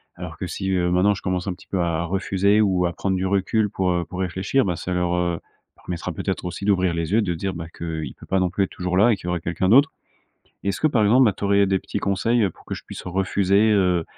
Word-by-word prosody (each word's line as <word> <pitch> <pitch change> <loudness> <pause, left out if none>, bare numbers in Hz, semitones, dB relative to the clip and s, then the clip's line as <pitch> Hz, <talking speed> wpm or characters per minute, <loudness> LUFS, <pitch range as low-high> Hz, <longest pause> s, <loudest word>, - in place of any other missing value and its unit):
Alors 85 -2 -8
que 95 - -4
si, 95 +3 -3
heu, 90 -2 +1
maintenant 90 +3 +3
je 100 - -7
commence 90 0 -2
un 95 - -1
petit - - -17
peu 95 - -2
à 85 -1 0
refuser 95 +3 +1
ou 95 -4 +2
à 85 - -1
prendre 95 +1 -1
du 95 - -1
recul 100 +3 +1
pour, 95 -1 0
heu, 85 -1 0
pour 90 - -8
réfléchir, 95 +8 0
bah, 90 -3 -1
ça 90 +3 -4
leur, 90 -1 0
heu, 85 -1 0 0.4
permettra 90 -2 -5
peut-être - - -3
aussi 90 +2 -5
d'ouvrir 95 -3 +2
les 85 0 -3
yeux 110 - +4
et - - +3
de 95 -5 -1
se 80 - -6
dire 95 +2 -3
ben 85 -1 -6
qu'il 80 -2 -4
peut - - -13
pas 95 - +1
non 90 -1 +1
plus 100 +3 0
être - - -12
toujours 90 0 -3
là 110 +5 +5
et - - +3
qu'il 90 - -9
y - - -1
aurait 90 0 -1
quelqu'un 85 +2 -1
d'autre. 140 +6 +6 0.7
Et - - -2
est-ce 100 - -2
que - - +3
par 120 -7 +2
exemple, 120 +5 +5
ben, 105 - +4
tu - - -12
aurais 100 0 +4
des 95 0 +1
petits - - -4
conseils, 110 +5 +1
heu, 95 - 0
pour - - -20
que - - -4
je - - -10
puisse - - -9
refuser, 95 +3 +2
heu 90 -4 +2
95 Hz, 290 wpm, -23 LUFS, 90-100 Hz, 0.7 s, d'autre